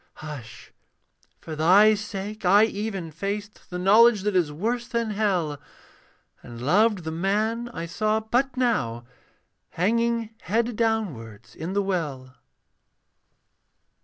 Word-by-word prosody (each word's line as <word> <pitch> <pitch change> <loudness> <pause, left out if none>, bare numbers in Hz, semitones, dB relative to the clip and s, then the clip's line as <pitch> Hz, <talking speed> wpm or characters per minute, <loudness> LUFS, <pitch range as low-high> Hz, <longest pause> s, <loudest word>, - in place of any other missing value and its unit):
Hush! 145 -7 -10 0.7
for 160 - -7
thy 190 +8 +6
sake 210 0 -5
I 200 +4 +6
even 200 -6 -3
faced 200 +5 -5
The 180 - -5
knowledge 210 +3 +5
that 210 -1 -1
is 170 -5 +2
worse 235 +10 -2
than 235 -3 -2
hell; 185 -9 0 0.8
And 120 -1 -10
loved 195 - +2
the 160 - -4
man 215 +7 -1
I 170 -8 -6
saw 215 +5 0
but 245 +4 -1
now 130 - 0 0.6
Hanging 230 +4 0
head 230 +3 -1
downwards 120 - -3
in 170 +4 -5
the 200 0 +1
well. 145 -9 -3
200 Hz, 120 wpm, -25 LUFS, 160-220 Hz, 0.8 s, thy